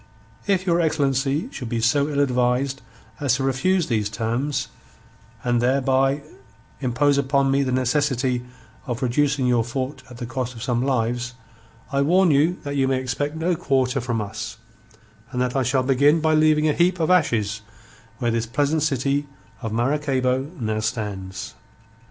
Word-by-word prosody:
If 190 -2 +1
your 175 -2 +2
excellency 145 - +1
should 125 -4 -6
be 115 - -1
so 140 +6 +2
ill 145 -1 +1
advised 130 0 +1 0.4
as 140 -4 +2
to 135 - -2
refuse 160 +7 +1
these 110 -5 0
terms, 125 +6 -2 0.8
and 120 -1 +1
thereby 135 +2 +2 0.6
impose 140 +2 +2
upon 140 0 +2
me 140 +1 +3
the 130 -2 0
necessity 130 -1 +1 0.4
of 125 +1 -3
reducing 135 +2 +1
your 120 -2 +3
fort 130 +3 -4
at 125 - -11
the 120 - -5
cost 125 +1 -4
of 115 - -7
some 120 -2 0
lives, 125 -1 -1 0.6
I 140 0 +1
warn 175 +4 +4
you 155 +6 +3
that 140 0 -4
you 135 -1 +2
may 135 -1 +1
expect 145 +4 -2
no 170 +2 0
quarter 135 -3 +1
from 120 -2 -2
us, 110 +2 -6 0.7
and 125 - -3
that 125 +1 0
I 135 - +2
shall 130 +1 +1
begin 140 +4 +4
by 160 0 +2
leaving 155 0 +4
a 150 - +3
heap 175 +2 +2
of 165 +2 +1
ashes 115 - +2 0.6
where 120 -1 0
this 115 0 -1
pleasant 145 +5 +1
city 140 0 0 0.3
of 110 -3 -4
Maracaybo 130 +1 0
now 110 -2 -1
stands." 105 -5 -4
135 Hz, 165 wpm, -23 LUFS, 120-145 Hz, 0.8 s, warn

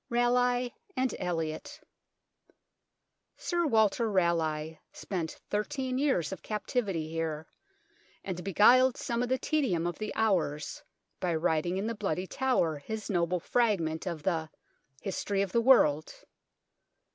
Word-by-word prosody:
RALEIGH 245 0 +2 0.3
AND 255 0 +1
ELIOT 165 -3 -3 1.6
Sir 345 -2 0
Walter 220 -1 +3
Raleigh 160 -4 0
spent 175 -5 -5
thirteen 255 +4 -1
years 265 - +1
of 190 -4 -6
captivity 205 - -2
here, 160 -1 -3 0.8
and 180 -2 -5
beguiled 245 +7 +5
some 235 0 -2
of 245 - -1
the 260 - +2
tedium 255 - 0
of 175 - -3
the 215 -1 -3
hours 175 -9 0 0.4
by 175 -2 0
writing 160 +2 0
in 195 - -2
the 230 - -1
Bloody 195 -5 -2
Tower 190 - +1
his 215 +8 -5
noble 175 -1 +1
fragment 185 -7 0
of 165 -4 -4
the 160 -4 -1 0.2
" 135 0 -34
History 195 0 -1
of 195 - -4
the 235 - +3
World." 155 - +4
195 Hz, 130 wpm, -30 LUFS, 165-240 Hz, 1.6 s, beguiled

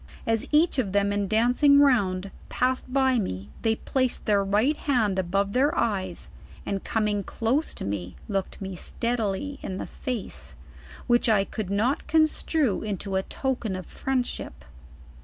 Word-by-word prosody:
As 225 -1 0
each 305 -1 +3
of 200 -7 -1
them 200 0 +2
in 205 -1 0
dancing 245 +7 +4
round, 200 -9 +3 0.2
passed 255 0 0
by 265 -2 +3
me 100 - -4
they 225 -1 +2
placed 255 +2 -1
their 205 -2 +3
right 210 +10 +2
hand 225 -11 +1
above 195 +2 0
their 285 +6 +2
eyes, 190 -5 -1 0.4
and 195 -1 -2
coming 210 -2 0
close 250 - -1
to - - -6
me, 95 -3 -4
looked 195 -3 -2
ine 190 -1 -5
steadily 235 - -2
in 185 - -4
the - - -4
face, 250 -6 -6 0.5
which 240 -1 +3
I 210 -3 +4
could 210 -2 -5
not 230 +9 0
construe 310 - +2
into 200 -2 -3
a 190 - +2
token 240 -2 -2
of 185 -1 -6
friendship. 260 - -3
220 Hz, 155 wpm, -26 LUFS, 195-260 Hz, 0.5 s, dancing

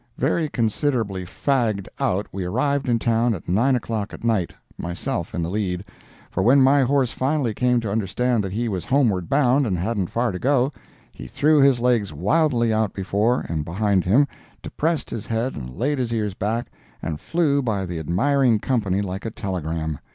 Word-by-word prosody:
Very 160 -3 0
considerably 110 -5 -1
fagged 110 -2 0
out 100 +3 0
we 95 0 -4
arrived 130 +8 0
in 120 - +3
town 115 0 +1
at 90 - -10
9 120 +9 +3
o'clock 110 -3 -3
at - - -14
night, 110 -7 +1 0.2
myself 85 0 -4
in 85 - -1
the 85 - -2
lead—for 95 -1 -5
when 125 +8 +5
my 135 +2 +5
horse 135 -1 +2
finally 135 -3 0
came 125 +1 +2
to 110 -3 -3
understand 110 +3 0
that 95 - -4
he 115 +4 -1
was 95 -6 -3
homeward 110 - +1
bound 135 -1 +3
and 95 -4 0
hadn't 95 0 -1
far 120 0 0
to 90 - -5
go, 135 +2 +2 0.4
he - - -9
threw 150 0 +3
his 135 -3 +5
legs 120 -4 +1
wildly 120 - +2
out 110 -2 0
before 105 +5 +1
and 80 -2 -2
behind 95 +3 +1
him, 130 +10 +4 0.4
depressed 160 -1 -2
his 110 -2 -5
head 115 +3 -1
and 60 -2 -6
laid 140 +7 0
his 120 -2 -1
ears 105 -4 -1
back, 110 +5 -2 0.3
and 75 -2 -3
flew 150 -4 +1
by 105 -6 -1
the 85 -2 -4
admiring 115 - +2
company 105 -5 0
like 95 0 -5
a 115 - -3
telegram. 85 - -3
115 Hz, 180 wpm, -23 LUFS, 95-130 Hz, 0.4 s, when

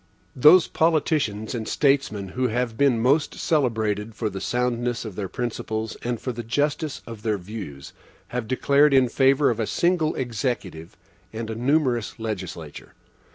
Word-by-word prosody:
Those 155 +7 +7
politicians 150 -10 0
and 115 -3 -4
statesmen 135 -9 +1
who 125 +6 -1
have 120 0 -1
been 140 0 +3
the 115 - -2
most 145 +4 +2
celebrated 110 -7 0
for 110 -3 -2
the 95 - -6
soundness 120 -1 -1
of 105 -4 -7
their 95 -2 -4
principles 110 -1 -4
and 120 -1 -2
for 130 - -3
the 120 0 -5
justice 145 +6 -1
of 115 -3 -9
their 105 -1 0
views, 90 -8 -8 0.4
have 125 -2 -3
declared 140 +3 +3
in 130 -2 +4
favor 135 +2 +3
of 115 - -4
a 110 - -1
single 170 -3 +1
Executive 115 - -4 0.3
and 110 0 -5
a - - -4
numerous 125 -2 0
legislature. 110 -4 -6
120 Hz, 155 wpm, -24 LUFS, 110-140 Hz, 0.4 s, Those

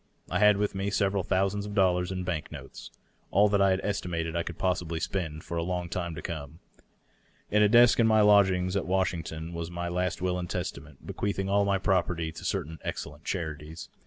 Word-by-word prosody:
I 90 - +1
had 105 -1 +6
with 105 0 0
me 100 +1 -2
several 100 -1 +1
thousands 100 +3 0
of 105 - -6
dollars 90 -2 +2
in 90 -1 -3
bank 85 -4 -3
notes - - -9 0.2
— - - -39
all 105 +2 +4
that 100 -1 +2
I 100 - +5
had 95 0 +1
estimated 85 -5 -2
I 85 - +1
could 85 -1 -6
possibly 85 -3 -1
spend 80 -4 -3
for 85 - -5
a - - +1
long 90 0 -3
time 85 -2 -3
to - - -7
come. 80 -3 -6 0.9
In 105 - +4
a 105 - +5
desk 120 +2 +6
in 115 - +5
my 110 -1 +5
lodgings 95 -3 +4
at 100 - -1
Wash 95 0 +1
ington 80 0 -6
was 85 0 -4
my 85 0 -4
last 90 +1 -1
will 90 0 -1
and 90 -1 -5
testament, 70 -1 -6
bequeathing 95 -1 -2
all 100 0 +3
my 100 -1 +2
property 90 -4 0
to - - -10
certain 80 +2 -3
excellent 75 +1 -6
charities. 80 -2 -5
90 Hz, 215 wpm, -28 LUFS, 85-100 Hz, 0.9 s, had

